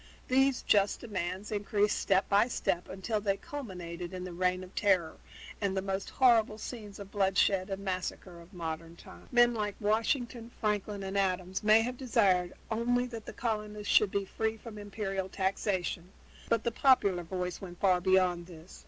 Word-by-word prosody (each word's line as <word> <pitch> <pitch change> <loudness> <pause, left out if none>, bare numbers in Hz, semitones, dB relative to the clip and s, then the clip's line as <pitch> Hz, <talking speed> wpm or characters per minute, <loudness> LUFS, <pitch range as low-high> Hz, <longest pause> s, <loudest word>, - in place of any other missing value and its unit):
These 265 0 +3
just 200 -1 +3
demands 190 -2 -4
increased 205 0 +1
step 195 -1 +2
by 205 +3 +4
step 180 -7 -1
until 210 +3 -2
they 200 -1 0
culminated 180 -11 -7
in 180 - -5
the 180 -1 -6
Reign 180 +1 0
of 185 +1 -12
Terror 180 -6 +2 0.4
and 195 -1 0
the - - +1
most 195 0 -3
horrible 230 -5 +4
scenes 215 -3 -7
of 200 -1 -9
bloodshed 195 -1 +2
and 195 0 -4
massacre 185 -1 -4
of 170 +2 -16
modern 165 -2 -5
times. - - -14
Men 240 -1 +5
like 210 -3 -2
Washington 230 +3 0
and 235 - -15
Franklin 210 -2 -2
and 195 +1 -1
Adams 185 -1 -1
may 215 +1 +6
have 250 +1 -3
desired 200 -9 +2 0.2
only 245 +2 +1
that 230 -3 -8
the - - -6
colonists 210 -2 -2
should 210 - +6
be 200 0 -1
free 220 +3 -2
from 220 -1 -9
imperial 195 -2 -3
taxation, 190 -2 -1 0.4
but 230 -1 +2
the 235 - 0
popular 205 -11 +3
voice 180 +1 -4
went 175 -2 -9
far 185 -2 +3
beyond 180 -2 +2
this. 170 0 -13
200 Hz, 175 wpm, -31 LUFS, 185-220 Hz, 0.4 s, may